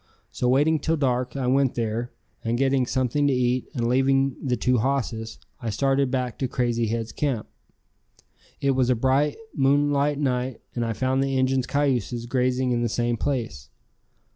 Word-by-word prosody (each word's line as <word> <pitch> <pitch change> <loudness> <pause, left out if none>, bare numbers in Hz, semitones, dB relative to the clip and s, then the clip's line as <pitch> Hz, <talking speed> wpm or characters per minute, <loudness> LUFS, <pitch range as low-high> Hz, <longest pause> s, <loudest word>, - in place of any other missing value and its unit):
So 125 - 0
waiting 150 +5 +3
till 160 +3 0
dark 125 -3 0
I 135 -2 -2
went 135 +1 +2
there, 115 +1 -2 0.3
and 115 +1 0
getting 135 -1 +2
something 130 +3 +1
to 140 - +2
eat 125 0 0
and 120 -2 0
leaving 135 +1 +2
the 125 -3 0
two 125 +3 +2
hosses, 115 -3 -2 0.2
I 115 - -3
started 135 +4 +1
back 125 -2 -2
to 130 - 0
Crazy 120 -2 0
Head's 115 0 -2
camp. 135 -7 -2 1.1
It 140 - +2
was 130 -1 +1
a 125 - +4
bright, 135 +5 +1 0.2
moonlight 145 +1 +2
night 130 -3 -1
and 120 - -1
I 115 -1 -1
found 130 +3 0
the 135 -1 0
Injuns' 130 -1 +1
cayuses 125 -4 0
grazing 125 +1 0
in 120 -1 +1
the 120 - 0
same 120 +1 0
place. 115 - -3
130 Hz, 170 wpm, -24 LUFS, 120-135 Hz, 1.1 s, a